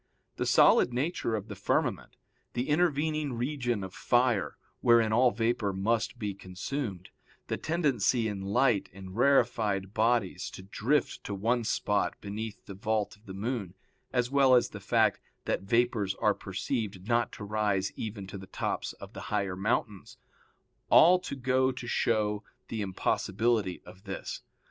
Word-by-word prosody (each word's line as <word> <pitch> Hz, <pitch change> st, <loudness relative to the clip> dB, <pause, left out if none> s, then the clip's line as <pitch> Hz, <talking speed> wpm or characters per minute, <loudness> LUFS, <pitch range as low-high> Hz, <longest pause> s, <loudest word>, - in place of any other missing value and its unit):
The -, -, -1 dB
solid -, -, +5 dB
nature 125 Hz, -2 st, -1 dB
of 105 Hz, -1 st, -4 dB
the -, -, -6 dB
firmament, -, -, -1 dB, 0.4 s
the 125 Hz, +4 st, -2 dB
intervening 155 Hz, -2 st, +1 dB
region 120 Hz, -3 st, -1 dB
of 95 Hz, -1 st, -7 dB
fire, 120 Hz, -5 st, +1 dB, 0.2 s
wherein 115 Hz, -2 st, +4 dB
all 125 Hz, +2 st, +5 dB
vapor 115 Hz, -2 st, 0 dB
must 105 Hz, +3 st, 0 dB
be 105 Hz, -2 st, -3 dB
consumed, 95 Hz, +1 st, -5 dB, 0.4 s
the -, -, -1 dB
tendency 135 Hz, -, +1 dB
in 100 Hz, -2 st, -4 dB
light 110 Hz, +2 st, +2 dB
and 95 Hz, -1 st, -10 dB
rarefied 110 Hz, -7 st, +2 dB
bodies 110 Hz, -5 st, +1 dB
to 95 Hz, -, -9 dB
drift 120 Hz, +8 st, 0 dB
to 100 Hz, -, -3 dB
one 115 Hz, +5 st, +1 dB
spot 105 Hz, -1 st, 0 dB
beneath 105 Hz, +1 st, -6 dB
the 100 Hz, -, -8 dB
vault 105 Hz, +2 st, -1 dB
of 105 Hz, +2 st, -26 dB
the 95 Hz, -, -7 dB
moon, 100 Hz, -3 st, -3 dB, 0.4 s
as 125 Hz, 0 st, 0 dB
well 135 Hz, -2 st, +5 dB
as 120 Hz, -, +3 dB
the -, -, -8 dB
fact -, -, +2 dB, 0.3 s
that -, -, 0 dB
vapors 105 Hz, -2 st, +1 dB
are 105 Hz, -, +2 dB
perceived 100 Hz, 0 st, -4 dB
not 120 Hz, 0 st, +2 dB
to -, -, -8 dB
rise 100 Hz, -2 st, 0 dB
even 105 Hz, -3 st, -5 dB
to 95 Hz, +1 st, -8 dB
the 95 Hz, -, -11 dB
tops -, -, -3 dB
of -, -, -12 dB
the -, -, -7 dB
higher 100 Hz, -3 st, -1 dB
mountains, 100 Hz, 0 st, -2 dB, 0.7 s
all 180 Hz, +2 st, +7 dB
to 160 Hz, -, -6 dB
go 130 Hz, 0 st, +2 dB
to 130 Hz, -1 st, -7 dB
show 105 Hz, -3 st, 0 dB, 0.3 s
the 110 Hz, -, -3 dB
impossibility 100 Hz, +1 st, 0 dB
of 95 Hz, +3 st, -14 dB
this. 95 Hz, -, -5 dB
110 Hz, 155 wpm, -29 LUFS, 100-125 Hz, 0.7 s, all